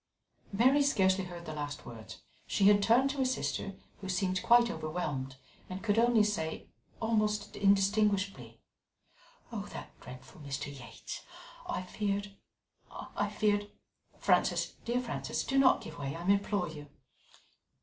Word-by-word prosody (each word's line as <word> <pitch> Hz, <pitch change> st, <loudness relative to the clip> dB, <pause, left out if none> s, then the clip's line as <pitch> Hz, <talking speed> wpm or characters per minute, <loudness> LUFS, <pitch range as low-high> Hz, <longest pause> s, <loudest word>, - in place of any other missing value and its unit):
Mary 255 Hz, +8 st, +4 dB
scarcely 190 Hz, -9 st, +3 dB
heard 175 Hz, -1 st, -9 dB
the 155 Hz, -, -5 dB
last 145 Hz, -1 st, -5 dB
words; 115 Hz, -2 st, -10 dB, 0.2 s
she -, -, 0 dB
had 205 Hz, 0 st, +7 dB
turned 245 Hz, +6 st, +4 dB
to 285 Hz, -, -7 dB
her 265 Hz, -, +2 dB
sister, 250 Hz, -6 st, -2 dB, 0.2 s
who 190 Hz, -, -7 dB
seemed 185 Hz, 0 st, 0 dB
quite 235 Hz, 0 st, +5 dB
overwhelmed 150 Hz, -, -3 dB, 0.3 s
and 185 Hz, +1 st, -6 dB
could 215 Hz, 0 st, +2 dB
only 235 Hz, -2 st, +5 dB
say, 185 Hz, -7 st, -2 dB, 0.3 s
almost 215 Hz, -2 st, 0 dB
indistinguishably: 200 Hz, -, +2 dB, 0.9 s
"That -, -, -6 dB
dreadful 125 Hz, +4 st, -12 dB
Mr. 145 Hz, 0 st, -5 dB
Yates! 115 Hz, -5 st, -8 dB, 0.5 s
I 180 Hz, -, -2 dB
feared 200 Hz, +1 st, -3 dB, 0.5 s
I 205 Hz, -, -4 dB
feared 205 Hz, -1 st, +1 dB, 0.3 s
" -, -, -33 dB
"Frances, -, -, +2 dB
dear 240 Hz, +1 st, +1 dB
Frances, 240 Hz, -, -3 dB
do 270 Hz, 0 st, +1 dB
not 265 Hz, -1 st, +5 dB
give -, -, -9 dB
way, 140 Hz, 0 st, -3 dB
I 170 Hz, +1 st, -6 dB
implore 200 Hz, -1 st, +2 dB
you. 150 Hz, -2 st, -9 dB
200 Hz, 140 wpm, -32 LUFS, 160-215 Hz, 0.9 s, had